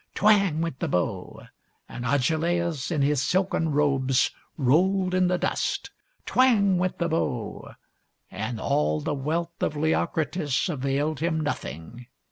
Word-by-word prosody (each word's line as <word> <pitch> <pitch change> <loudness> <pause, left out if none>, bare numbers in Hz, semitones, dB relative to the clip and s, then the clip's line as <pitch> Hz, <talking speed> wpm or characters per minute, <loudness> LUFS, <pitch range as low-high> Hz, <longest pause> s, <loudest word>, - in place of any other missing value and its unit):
Twang! 195 -6 +3
went 165 -6 -3
the - - -1
bow; 90 -1 -2 0.4
and 120 - -7
Agelaus 160 +3 0
in 150 -5 0
his 145 -1 +2
silken 180 -1 +1
robes 135 -3 +2 0.3
rolled 180 +7 +2
in 185 0 +3
the 180 0 +1
dust. - - -2 0.3
Twang! 205 -8 +3
went 185 0 -1
the 170 - 0
bow; 130 -9 -3 0.6
and 110 +4 -4
all 145 +4 +1
the 150 0 -2
wealth 165 +5 -3
of 150 - 0
Leocritus 155 -1 0
availed 140 0 -1
him 160 0 0
nothing. 120 - -5
155 Hz, 130 wpm, -26 LUFS, 135-175 Hz, 0.6 s, Twang